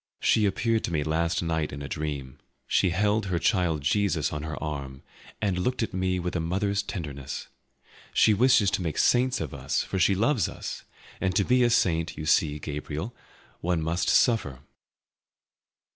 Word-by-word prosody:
She 105 -2 +3
appeared 115 +3 0
to - - -4
me 75 -3 0
last 85 +3 0
night 80 -2 -1
in 70 +1 -6
a - - -5
dream. 70 -4 -5 0.3
She 95 - +2
held 105 +3 +1
her 90 -2 0
child 85 -5 +1
Jesus 85 -2 +1
on 75 - -3
her 80 +1 -5
arm, 70 -4 -5 0.4
and 95 -4 0
looked 125 +6 0
at - - -4
me 95 0 0
with 90 +1 -3
a - - +1
mother's 100 +5 0
tenderness. 75 -9 -6 0.6
She 110 - +4
wishes 115 -2 +4
to - - 0
make 80 -4 -3
saints 125 +1 +3
of 75 -5 -4
us, - - -1
for 95 - -3
she 95 +2 +4
loves 115 +4 +2
us; - - -7 0.4
and 95 -1 0
to 100 - +3
be 125 +4 +3
a 120 - +4
saint, 85 -7 +1
you 75 - -5
see, 75 -1 +2
Gabriel, 75 +7 -5 0.5
one 85 -2 0
must 85 +3 0
suffer." 75 - +2
90 Hz, 175 wpm, -27 LUFS, 75-100 Hz, 0.6 s, She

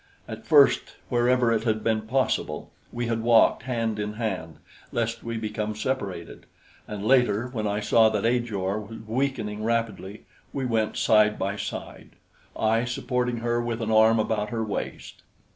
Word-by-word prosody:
At - - -8
first, - - +5 0.2
wherever 120 0 +3
it 110 -1 +1
had 110 -2 0
been 110 -1 0
possible, 120 - -1 0.2
we 120 0 -3
had 115 -1 -1
walked 115 -1 +4
hand 115 -4 -2
in 105 0 -3
hand 95 -8 -4 0.4
lest 115 0 -2
we 115 0 -4
become 110 -1 -3
separated, 110 -4 -4 0.4
and 105 -1 -5
later, 125 -2 +3
when 110 -4 -3
I 105 +1 -1
saw 110 +1 +5
that 105 -1 -1
Ajor 110 -5 0
was 110 +2 -9
weakening 110 -3 -2
rapidly, 110 -3 -2 0.3
we 135 -2 -2
went 115 -3 0
side 105 -1 +4
by 100 +1 -2
side, - - -7 0.4
I 110 +1 +2
supporting 125 0 -1
her 120 0 +1
with 120 -1 -3
an 110 -1 -2
arm 110 +1 +5
about 105 -1 -1
her 115 0 -2
waist. 105 -2 -5
110 Hz, 160 wpm, -26 LUFS, 105-120 Hz, 0.4 s, first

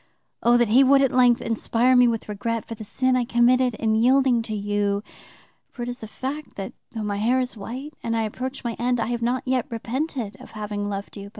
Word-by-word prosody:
O, 240 +1 +5
that 240 -2 +2
He 250 +5 +6
would 275 +1 +5
at 270 - +2
length 245 -2 +4
inspire 230 +2 +2
me 245 -1 +6
with 230 -2 -1
regret 225 +2 -3
for - - -6
the 220 - -8
sin 255 +4 0
I 250 - +2
committed 245 0 +3
in 220 0 0
yielding 250 +2 +4
to 220 -1 -4
you; 205 0 -1 0.7
for 240 - -7
it 240 - -4
is 245 +1 -6
a 220 - -6
fact 275 +7 -6
that, 195 -1 -6 0.2
though 220 -2 -4
my 205 -1 -2
hair 240 +5 +2
is 255 -1 -2
white 255 +8 -7
and 230 0 -1
I 225 - +1
approach 255 +5 -5
my 235 -1 -2
end, 245 0 +1
I 225 - -1
have 240 -1 -2
not 245 +2 0
yet 255 -2 0
repented 240 0 -3
of - - -13
having 205 -1 -4
loved 200 +1 -6
you. 200 0 -8
235 Hz, 230 wpm, -24 LUFS, 215-255 Hz, 0.7 s, He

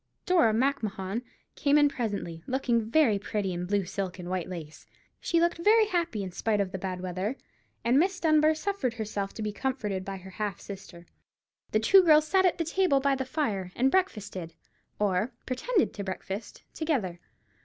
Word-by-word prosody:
Dora 340 - +4
Macmahon 220 -4 -1 0.3
came 285 0 +3
in 295 -1 +6
presently, 205 - -3
looking 240 -4 0
very 235 -7 +4
pretty 200 -2 -2
in 175 +1 -4
blue 200 0 +1
silk 190 +1 -4
and 180 -1 -6
white 185 -2 -2
lace. 160 -4 -8 0.3
She 335 - +1
looked 340 0 +1
very 435 +5 +5
happy, 340 - -1
in 185 - -5
spite 210 +3 0
of 195 -2 0
the 190 - -4
bad 185 -1 -4
weather, 185 +6 -2 0.5
and 245 +4 +4
Miss 370 +2 +1
Dunbar 310 -1 +4
suffered 310 - -2
herself 205 -3 -3
to 220 - -4
be 210 - -1
comforted 210 -5 -2
by 195 0 -5
her 190 +1 -11
half 205 -1 -3
sister. 185 -3 -10 0.6
The 215 - +2
two 375 - +7
girls 310 -3 +5
sat 380 +2 +4
at 355 - 0
the 330 - -1
table 330 -4 +2
by 280 0 +2
the 265 -1 -2
fire, 220 - -2
and 265 +2 +3
breakfasted, 205 - -1 0.4
or 205 +4 0
pretended 370 - 0
to 200 - -5
breakfast, 195 +2 -6
together. 240 - -1
220 Hz, 180 wpm, -28 LUFS, 190-305 Hz, 0.6 s, two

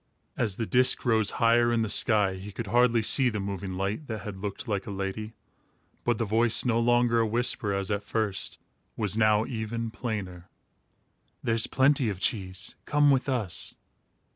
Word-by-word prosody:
As 105 -5 -1
the 115 - -3
disc 125 +3 +4
rose 110 -3 +2
higher 120 0 +3
in 115 -1 +1
the 110 - -1
sky, 105 -2 +2
he 95 +2 -9
could 115 +4 -6
hardly 120 +1 +2
see 130 +3 +6
the 110 -2 -4
moving 100 -1 -5
light, 100 +10 -3
that 110 -3 -5
had 100 -1 -8
looked 100 +4 -6
like 100 -1 -3
a - - -5
lady; 100 +3 -5 0.7
but 120 -2 0
the 115 - -1
voice, 115 +3 +2
no 115 -2 +1
longer 120 0 +2
a 115 - +1
whisper, 115 -2 -1
as 100 +1 -2
at 100 0 -1
first, 105 -2 -3 0.4
was 105 -2 +1
now 110 0 +3
even 115 -1 -4
plainer: 100 -7 -6 0.9
"There's 115 -1 +3
plenty 135 -2 +2
of 100 -3 -5
cheese. 95 -3 -2
Come 145 -1 +3
with 135 +1 +1
us." 110 -9 -2
110 Hz, 175 wpm, -27 LUFS, 100-120 Hz, 0.9 s, see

